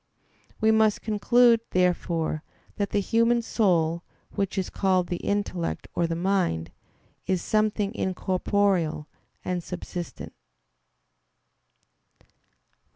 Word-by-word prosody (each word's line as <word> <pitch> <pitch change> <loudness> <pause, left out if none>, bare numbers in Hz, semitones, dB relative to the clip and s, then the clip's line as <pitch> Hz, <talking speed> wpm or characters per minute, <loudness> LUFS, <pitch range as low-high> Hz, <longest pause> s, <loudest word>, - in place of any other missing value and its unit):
We 220 -1 +4
must 220 -1 +3
conclude, 230 +2 +4
therefore, 170 -3 0 0.4
that 200 -1 -1
the - - +1
human 230 +3 +2
soul, 170 -7 +1 0.3
which 195 -1 -2
is 190 - -2
called 185 -3 +1
the 175 - -1
intellect 200 -4 -2
or 170 - +1
the 165 - -2
mind, 175 - 0 0.6
is 185 -2 0
something 215 -1 +1
incorporeal 185 -5 0 0.4
and 180 -1 -2
subsistent. 175 0 -7
190 Hz, 95 wpm, -26 LUFS, 175-210 Hz, 0.6 s, We